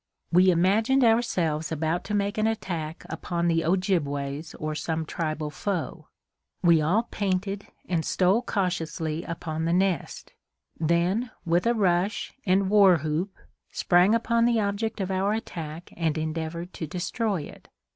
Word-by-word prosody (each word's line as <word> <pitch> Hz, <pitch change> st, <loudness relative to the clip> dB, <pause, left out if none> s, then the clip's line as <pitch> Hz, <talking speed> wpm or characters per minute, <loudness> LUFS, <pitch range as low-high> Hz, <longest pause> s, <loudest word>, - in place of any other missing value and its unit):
We 180 Hz, +2 st, +6 dB
imagined 215 Hz, +10 st, +3 dB
ourselves 175 Hz, -10 st, +1 dB
about 160 Hz, +2 st, -1 dB
to 210 Hz, -, -2 dB
make 200 Hz, +1 st, 0 dB
an 215 Hz, -, +2 dB
attack 170 Hz, -8 st, -3 dB
upon 170 Hz, -1 st, -2 dB
the 165 Hz, -1 st, +2 dB
Ojibways 155 Hz, -5 st, -1 dB
or 155 Hz, 0 st, -3 dB
some 160 Hz, +1 st, -2 dB
tribal 155 Hz, -1 st, -3 dB
foe. 180 Hz, +1 st, -3 dB, 0.6 s
We 170 Hz, -3 st, +5 dB
all 185 Hz, +9 st, +2 dB
painted 195 Hz, 0 st, -2 dB, 0.2 s
and 170 Hz, -3 st, 0 dB
stole 190 Hz, +8 st, +2 dB
cautiously 170 Hz, -6 st, -2 dB
upon 160 Hz, -1 st, -4 dB
the 165 Hz, -, +1 dB
nest; 185 Hz, -4 st, -1 dB, 0.5 s
then, 170 Hz, +9 st, +1 dB, 0.2 s
with 175 Hz, +5 st, +2 dB
a 240 Hz, -, +3 dB
rush 195 Hz, 0 st, +1 dB
and 190 Hz, +1 st, +3 dB
war 195 Hz, -4 st, +7 dB
whoop, 160 Hz, +6 st, -2 dB, 0.4 s
sprang 180 Hz, +5 st, +4 dB
upon 230 Hz, 0 st, +2 dB
the 235 Hz, -1 st, +3 dB
object 210 Hz, +2 st, -1 dB
of 190 Hz, 0 st, -2 dB
our 190 Hz, +2 st, +1 dB
attack 165 Hz, -6 st, -6 dB
and 160 Hz, -2 st, 0 dB
endeavored 160 Hz, +2 st, -4 dB
to 160 Hz, -, -5 dB
destroy 185 Hz, -, -2 dB
it. -, -, -12 dB
175 Hz, 145 wpm, -26 LUFS, 160-200 Hz, 0.6 s, war